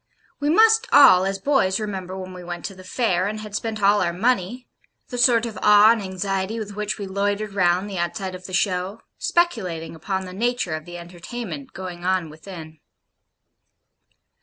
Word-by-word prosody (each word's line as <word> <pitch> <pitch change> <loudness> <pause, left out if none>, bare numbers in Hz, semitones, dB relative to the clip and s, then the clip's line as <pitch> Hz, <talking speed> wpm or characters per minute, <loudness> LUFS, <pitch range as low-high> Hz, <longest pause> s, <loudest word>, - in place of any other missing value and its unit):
We 290 +1 0
must 445 +7 +5
all, 190 -10 +7
as 195 0 -1
boys, 195 -5 +1
remember 190 -3 -5
when 185 0 -7
we 180 -1 -9
went 175 0 -6
to 200 - -5
the 185 0 -13
fair, 185 -2 0
and 215 +1 -4
had 210 -1 -9
spent 215 0 -3
all 205 +1 +5
our 175 - +1
money 235 +4 -1 0.4
the 245 - -5
sort 240 -2 +4
of 225 -2 -6
awe 210 +1 +7
and 230 -2 +1
anxiety 195 +2 -3
with 205 -2 -6
which 210 0 -2
we 200 - -5
loitered 200 +2 -2
round 180 0 +2
the 195 -3 -5
outside 185 +2 -3
of 185 0 -9
the - - -10
show, 190 +3 -1 0.2
speculating 185 - 0
upon 190 +4 -3
the 180 - -9
nature 235 -4 -1
of 155 0 -5
the 175 0 -8
entertainment 175 - -8
going 180 -2 -7
on 180 -3 0
within. 160 -1 -11
195 Hz, 185 wpm, -23 LUFS, 180-215 Hz, 0.4 s, all